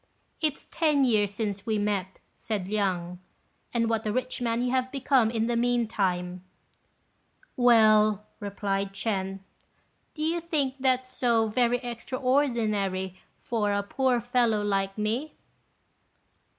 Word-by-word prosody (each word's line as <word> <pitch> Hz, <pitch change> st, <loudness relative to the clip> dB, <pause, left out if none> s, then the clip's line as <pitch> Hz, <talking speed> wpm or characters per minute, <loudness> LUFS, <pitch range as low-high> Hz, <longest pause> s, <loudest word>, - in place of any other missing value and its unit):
"It's 305 Hz, -3 st, -1 dB
ten 300 Hz, -4 st, +3 dB
years 210 Hz, -4 st, +2 dB
since 205 Hz, -1 st, -4 dB
we 220 Hz, -1 st, +1 dB
met," 200 Hz, -3 st, -2 dB, 0.2 s
said 205 Hz, -5 st, -4 dB
Liang, 185 Hz, -4 st, -1 dB, 0.5 s
"and 230 Hz, -1 st, +1 dB
what 225 Hz, -1 st, -1 dB
a -, -, +1 dB
rich 255 Hz, +2 st, -2 dB
man 235 Hz, 0 st, 0 dB
you 250 Hz, -, 0 dB
have 255 Hz, 0 st, 0 dB
become 270 Hz, -4 st, +2 dB
in 225 Hz, -1 st, 0 dB
the 240 Hz, 0 st, 0 dB
meantime." 195 Hz, -7 st, 0 dB, 1.1 s
"Well," 215 Hz, -4 st, +5 dB
replied 200 Hz, -1 st, -2 dB
Ch'ên, 195 Hz, -2 st, -2 dB, 0.7 s
"do 305 Hz, -, -3 dB
you 335 Hz, +2 st, 0 dB
think 285 Hz, -5 st, -1 dB
that 260 Hz, -1 st, +1 dB
so 235 Hz, -3 st, +1 dB
very 240 Hz, +2 st, +2 dB
extraordinary 235 Hz, -7 st, -1 dB, 0.2 s
for 215 Hz, -3 st, -1 dB
a 200 Hz, 0 st, 0 dB
poor 255 Hz, +4 st, +1 dB
fellow 235 Hz, -3 st, +1 dB
like 195 Hz, -1 st, -1 dB
me?" 225 Hz, +8 st, -2 dB
225 Hz, 125 wpm, -27 LUFS, 200-250 Hz, 1.1 s, Well